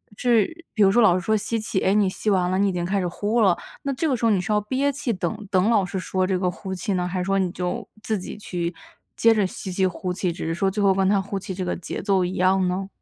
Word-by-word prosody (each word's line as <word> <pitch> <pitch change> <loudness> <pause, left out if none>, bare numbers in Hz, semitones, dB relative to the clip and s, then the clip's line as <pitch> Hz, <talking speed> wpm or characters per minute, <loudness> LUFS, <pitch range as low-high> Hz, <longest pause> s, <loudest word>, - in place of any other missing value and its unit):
是 245 - +1
比 215 - +4
如 195 - +6
说 240 - +4
老 185 -5 +6
师 185 - -1
说 220 - +2
吸 225 +2 -1
气， 215 -3 -1
哎， 190 - +2
你 205 -2 +4
吸 200 +3 -2
完 185 -2 +2
了 185 - +1
你 200 - +3
已 - - 0
经 175 -1 -2
开 195 +2 0
始 180 - -1
呼 210 +6 0
了， 190 -4 +4 0.2
那 280 - -2
这 300 +5 -1
个 275 - +2
时 235 - -7
候 - - +5
你 195 - +3
是 185 +4 -3
要 210 - +2
憋 265 +6 0
气 275 -3 -3
等 200 +1 -3
等 190 +4 +3
老 210 -4 +4
师 185 +1 -4
说 185 0 -1
这 190 -2 +1
个 180 -1 0
呼 190 +1 -6
气 185 +3 -2
呢， 180 -1 0
还 185 +1 -3
是 - - 0
说 195 0 +1
你 185 -2 +1
就 185 +5 -3 0.2
自 220 -4 -1
己 185 - -7
去 175 -4 -4 0.4
接 230 0 +5
着 210 -3 +2
吸 185 - -7
气、 185 +1 +2
呼 180 0 -4
气， 180 -1 -1
只 165 - -6
是 165 - -1
说 190 +3 +1
最 205 +2 -1
后 195 -1 +5
跟 190 0 +2
她 200 -1 +3
呼 195 +1 -3
气 190 -1 -6
这 185 - -3
个 180 - -1
节 175 - -6
奏 195 -3 +2
一 180 - -2
样 185 0 +3
呢？ 190 +2 -2
195 Hz, 325 characters per minute, -23 LUFS, 185-215 Hz, 0.4 s, 如